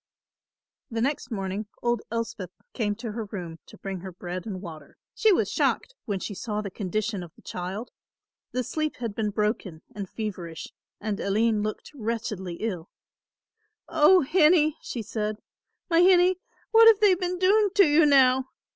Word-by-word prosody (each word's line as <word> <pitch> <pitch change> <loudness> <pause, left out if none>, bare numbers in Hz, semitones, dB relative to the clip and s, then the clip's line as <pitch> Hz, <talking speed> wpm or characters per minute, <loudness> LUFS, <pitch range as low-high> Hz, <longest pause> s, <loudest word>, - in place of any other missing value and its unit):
The 230 -2 -3
next 285 +4 -1
morning 200 -1 -3 0.2
old 240 -2 +1
Elspeth 230 -5 -3 0.2
came 210 -4 -1
to 230 0 -6
her 220 0 -4
room 175 -5 -7
to - - -14
bring 195 -1 -5
her 190 +1 -8
bread 180 +2 -6
and 190 -3 -4
water. 160 -6 -10 0.2
She 440 - +4
was 370 - +2
shocked - - 0
when 200 -3 -2
she 205 - -5
saw 210 +2 -3
the 200 -2 -4
condition 205 +2 -2
of 175 -2 -9
the - - -21
child. 190 +6 -5 0.6
The 255 - -1
sleep 310 +5 -2
had 230 -4 -4
been 215 0 -1
broken 210 -5 -2
and 200 -3 -6
feverish 185 -7 -5 0.3
and 210 -1 -3
Aline 215 +2 +1
looked 215 0 -4
wretchedly 220 -7 -4
ill. 180 -4 -4 1.0
"O 335 +3 +6
hinnie," 310 +1 +4
she 235 - -5
said, 215 0 -3 0.5
"my 335 -1 +4
hinnie, 360 0 +5 0.3
what 455 0 +8
have 445 -3 +7
they 415 -3 +6
been 360 0 -2
doing 405 +3 +4
to 395 - +7
you 300 +2 +5
now? 265 -2 +5
220 Hz, 165 wpm, -26 LUFS, 195-295 Hz, 1.0 s, what